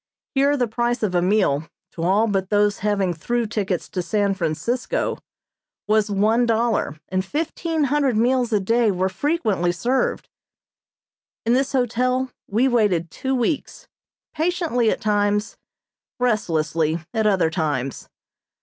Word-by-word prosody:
Here 280 +1 +3
the 245 -2 +1
price 240 +1 -1
of 200 -4 0
a 175 - +2
meal, 180 -6 +1 0.2
to 165 - -8
all 195 +6 +3
but 195 -3 -1
those 205 -1 +2
having 200 -3 0
through 235 +8 -1
tickets 200 -4 -2
to 185 - -2
San 200 +1 0
Francisco, 195 - -2 0.7
was 215 0 +2
one 215 +4 +2
dollar, 225 -9 0
and 185 0 0
fifteen 320 - -2
hundred 280 -4 +1
meals 245 +1 +2
a 210 - +3
day 230 +3 +2
were 190 -1 0
frequently 210 - 0
served. 240 +10 -1 1.2
In 230 - +3
this 270 +2 +1
hotel 255 +1 0 0.2
we 230 +6 +2
waited 200 -9 +1
two 265 0 -2
weeks, 255 +4 -2 0.5
patiently 320 -8 +1
at - - -1
times, 210 0 0 0.6
restlessly 165 -9 0 0.2
at 220 -2 +1
other 185 -6 +2
times. 145 -6 -2
215 Hz, 135 wpm, -22 LUFS, 185-245 Hz, 1.2 s, Here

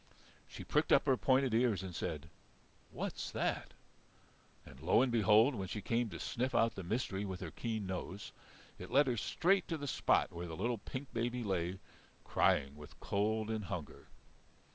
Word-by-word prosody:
She - - -9
pricked - - +1
up - - +6
her 135 -2 +4
pointed 130 -1 +2
ears 115 -4 +2
and 95 -2 -6
said, 80 -1 -4 0.6
"What's - - -4
that!" - - -2 0.9
And 65 - -13
lo 90 +9 +4
and 130 - +1
behold, 110 +3 +5
when 95 -5 -4
she 105 - -4
came 115 +2 0
to - - -7
sniff 125 +2 -2
out 115 0 +3
the - - -6
mystery 100 +1 -2
with 95 -2 -4
her 85 -4 -6
keen 110 -3 -3
nose, 95 +2 -5 0.5
it 90 - -8
led 140 +3 +5
her 125 -2 0
straight 180 - +2
to 165 - -2
the 145 - -5
spot 140 - +2
where 85 +1 -5
the 80 -1 -6
little 115 +3 -1
pink 130 +6 -7
baby 120 +1 -1
lay, 95 -3 -1 0.5
crying 70 +1 +2
with 75 0 -13
cold 110 +2 0
and 110 -2 -2
hunger. 85 -6 -6
110 Hz, 180 wpm, -35 LUFS, 95-125 Hz, 0.9 s, up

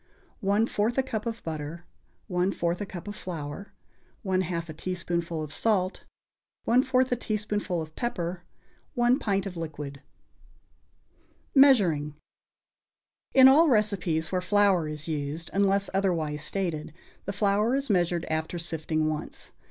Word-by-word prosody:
1/4 210 +3 +1
a 265 - +3
cup 230 -3 -4
of 230 0 -4
butter. 160 +2 -5 0.4
1/4 180 -1 0
a 205 - -3
cup 180 0 -8
of 205 - -5
flour. 170 0 -6 0.5
1/2 180 -3 -1
a 155 - -7
teaspoonful 170 -1 -3
of 150 0 -5
salt. 190 -3 0 0.6
1/4 255 +1 +3
a - - +3
teaspoonful 210 -6 -2
of 155 0 -13
pepper. 175 -7 -3 0.5
1 240 +2 +3
pint 195 -3 0
of 190 -2 -5
liquid. 150 -4 -6 1.5
=Measuring.= 185 - +5 1.2
In 265 -1 +10
all 305 +5 +7
recipes 195 - +1
where 185 -1 0
flour 190 -3 +3
is 150 +1 -6
used, 155 +1 -4
unless 200 0 +2
otherwise 165 -6 0
stated, 155 -3 -2 0.3
the 200 - -3
flour 205 +4 +2
is 275 0 -1
measured 175 -2 +1
after 160 +2 -2
sifting 160 -2 -1
once. 155 -1 -4
180 Hz, 130 wpm, -27 LUFS, 160-210 Hz, 1.5 s, In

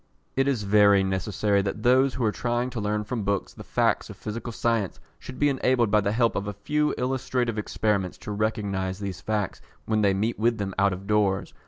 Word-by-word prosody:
It 135 +1 +2
is 130 -6 0
very 100 -1 +5
necessary 100 +1 0
that 100 +2 -4
those 130 +2 +4
who 130 - -2
are 105 - +2
trying 120 +2 -1
to 120 - -4
learn 105 +1 -1
from 115 +2 -3
books 100 -1 -1
the - - -10
facts - - 0
of - - -9
physical 115 +2 -5
science 115 -4 -1 0.2
should 130 - -9
be 145 - +3
enabled 130 -5 +2
by 105 +1 +4
the 100 +1 0
help 115 +1 +2
of 100 - -2
a 105 - -3
few 150 +8 0
illustrative 125 -3 -1
experiments 105 -3 -1
to - - -4
recognise 100 -3 -1
these 95 -3 -5
facts 105 -4 -2 0.2
when 110 -1 +1
they 100 -2 +3
meet 110 +4 -1
with 115 +1 +2
them 100 -2 -3
out 100 0 +4
of 95 +1 -6
doors. 100 -2 +1
105 Hz, 210 wpm, -26 LUFS, 100-120 Hz, 0.2 s, very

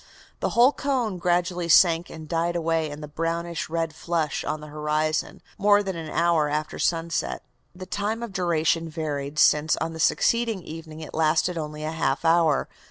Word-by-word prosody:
The - - 0
whole 245 +3 +7
cone 250 -10 -1
gradually 175 0 0
sank 170 0 +5
and 160 -1 -9
died 170 +1 -1
away 165 -2 0
in 145 +1 -8
the 150 - -6
brownish 165 +2 -3
red 165 -1 -2
flush 165 -2 -2
on 155 - -3
the 150 - -10
horizon, 155 +1 -1 0.2
more 205 0 +4
than 190 -2 -3
an 160 -2 -6
hour 165 -3 +2
after 150 +1 -3
sunset." 165 0 -1 0.3
The 185 0 -8
time 205 +5 -2
of 230 -4 -6
duration 165 -2 +1
varied, 150 -2 -4
since, 150 0 +4
on 165 0 -3
the 160 - -8
succeeding 230 +3 +2
evening, 160 -1 -9
it 155 - -9
lasted 160 +3 +2
only 150 -1 -5
a 155 - -2
half 160 +1 -1
hour. 165 -3 +3
165 Hz, 175 wpm, -25 LUFS, 155-175 Hz, 0.3 s, whole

